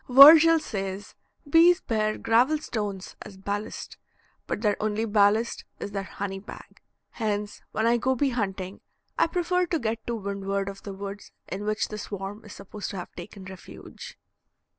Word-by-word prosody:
Virgil 310 +5 +10
says 195 -7 -5 0.3
bees 335 +4 +6
bear 215 -6 -1
gravel 240 +7 +3
stones 205 -9 -4
as 200 -2 -10
ballast, 205 +2 -5 0.5
but - - -3
their 210 -3 +2
only 215 +1 0
ballast 210 +2 +2 0.2
is 205 - -5
their 195 -1 -2
honey 195 0 -5
bag. 205 - -12 0.3
Hence, 210 -2 -3
when 220 - 0
I 235 +1 +4
go 260 +3 +1
bee 275 +2 +1
hunting, 195 -5 -3 0.4
I - - +5
prefer 360 +1 0
to 335 - 0
get 225 -4 -3
to 235 - -1
windward 200 -1 -3
of 195 0 -9
the 200 - -7
woods 200 +1 -7 0.2
in 200 +2 -4
which 215 +1 -1
the 210 - -6
swarm 200 +1 -6
is 210 - -10
supposed 200 +1 -7
to 200 - -6
have 180 - -7
taken 185 +2 -10
refuge. 190 -2 -11
210 Hz, 165 wpm, -26 LUFS, 195-235 Hz, 0.5 s, Virgil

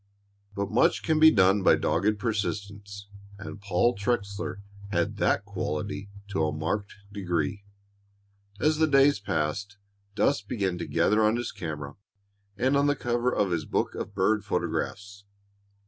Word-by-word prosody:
But 100 0 -2
much 165 - +3
can 160 -1 +2
be 160 0 +9
done 100 -5 +4
by - - +6
dogged 105 +5 +1
persistence, 100 -2 -4 0.3
and 100 0 -9
Paul 100 +4 +2
Trexler 100 -2 -2 0.3
had 85 -4 -1
that - - +1
quality 100 +6 -4 0.2
to 95 -5 0
a 75 - +1
marked 80 +7 -3 0.2
degree. 95 -1 -2 0.9
As 155 0 +2
the 160 - +4
days 140 -4 +4
passed, 100 +2 -2 0.4
dust 110 -3 +1
began 95 -6 -1
to - - -4
gather 105 +2 +2
on 110 +1 +3
his 120 0 -3
camera 75 -7 -6 0.6
and 130 +6 +2
on 140 +1 +3
the 145 - +2
cover 120 -1 0
of 100 -6 0
his 80 -3 -1
book - - -1
of 100 - -6
bird 105 +2 +2
photographs. 100 0 -3
100 Hz, 145 wpm, -27 LUFS, 95-115 Hz, 0.9 s, be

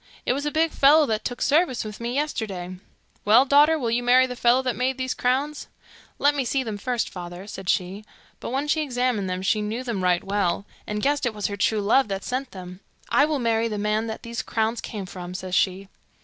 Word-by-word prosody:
It - - +2
was 285 +3 -2
a - - -1
big 320 +1 +1
fellow 295 +3 +5
that 220 -4 -2
took 245 - -3
service 295 -4 +2
with 215 -1 -8
me 235 +2 -3
yesterday.' 200 -11 -3 0.5
'Well, 225 +6 +6
daughter, 295 +3 +5
will 240 -6 -2
you 240 +1 +1
marry 250 +1 +5
the 250 -1 -6
fellow 245 +2 +3
that 255 -2 -1
made 260 +1 -1
these 260 0 -2
crowns?' 275 +4 -1 0.5
'Let 290 +1 +3
me 280 -2 -1
see 260 +2 0
them 215 -4 -5
first, 245 +1 -1
father,' 175 +1 -8
said 195 -2 -7
she; 190 +3 -1 0.4
but - - -6
when 270 +4 -2
she 310 +1 +1
examined 245 -8 -1
them 185 0 -3
she 210 +2 +1
knew 220 +4 -3
them 225 -7 -3
right 180 -1 +2
well, 200 -1 -1 0.2
and 210 0 -3
guessed 285 -2 +1
it 225 - -3
was 210 - -4
her 200 - -1
true 215 +2 +1
love 230 +6 +3
that 195 -1 -4
sent 255 +1 -3
them. 180 -2 -10 0.3
'I 285 - +4
will 305 -1 -1
marry 230 -2 +1
the 215 -2 -4
man 210 +2 0
that 220 - -6
these 235 0 -4
crowns 225 +1 -1
came 205 -3 -6
from,' 180 -1 -8
says 185 -1 -6
she. 190 +1 +1
230 Hz, 230 wpm, -24 LUFS, 200-260 Hz, 0.5 s, Well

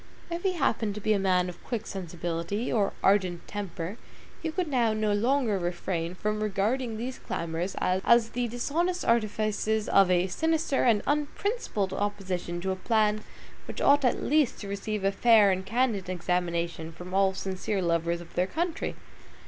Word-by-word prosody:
If 340 +1 -2
he 380 0 +1
happened 225 - 0
to - - -4
be 215 +1 +2
a 200 - +1
man 185 -2 +2
of 175 -1 -9
quick 230 -3 -3
sensibility, 175 +3 -3
or 205 -4 +2
ardent 185 -3 +2
temper, 195 -1 -5 0.4
he 320 - -2
could 355 +2 -1
now 240 -6 +2
no 215 -1 +1
longer 230 -1 +2
refrain 175 0 -2
from 210 +2 -2
regarding 220 +3 0
these 250 +3 -5
clamors 170 +3 -3
as 225 +5 +3
the 245 0 -1
dishonest 325 +10 -1
artifices 215 -1 +1
of 195 -2 +5
a 180 0 +3
sinister 320 - 0
and 225 -4 +3
unprincipled 295 - -1
opposition 190 -4 -2
to 190 +1 -1
a - - -1
plan 215 +1 +1 0.4
which - - -7
ought 285 +1 +5
at 250 - +1
least 300 -3 +2
to 205 - -6
receive 200 +1 -3
a 195 - +3
fair 215 -1 +5
and 190 0 -2
candid 220 -4 0
examination 170 -2 -1
from 180 +3 -10
all 195 0 +3
sincere 190 +1 -2
lovers 170 -1 0
of 170 - -13
their 180 +1 +1
country! 335 - -2
205 Hz, 165 wpm, -28 LUFS, 185-235 Hz, 0.4 s, of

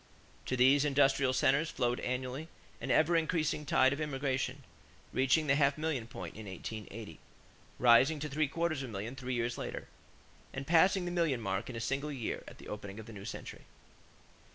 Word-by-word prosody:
To 130 - -1
these 135 +3 +5
industrial 140 -2 +3
centers 140 +5 +2
flowed 120 -4 0
annually 130 +4 -3 0.3
an - - -4
ever 165 +2 +4
increasing 155 -2 0
tide 135 -4 +4
of 145 - -4
immigration, 135 -2 -2 0.5
reaching 135 +4 +3
the 140 - +3
half 140 0 +3
million 150 -7 -2
point 90 -8 -7
in 110 -1 -8
1880; 105 -1 -7 0.6
rising 125 +6 +5
to 150 - -2
three 150 +1 0
quarters 160 0 -1
of 130 - -5
a - - -9
million 110 +5 -5
three 130 -1 -3
years 120 0 -1
later; - - -5 0.7
and 135 - -5
passing 180 +4 +4
the 175 - -2
million 165 -8 +1
mark 95 -1 -2
in 125 - -6
a - - -3
single 135 +6 -2
year 130 -6 -4
at - - -11
the - - -12
opening 105 0 -7
of 110 - -8
the 115 - -10
new 100 -1 -9
century. - - -8
135 Hz, 185 wpm, -32 LUFS, 120-150 Hz, 0.7 s, these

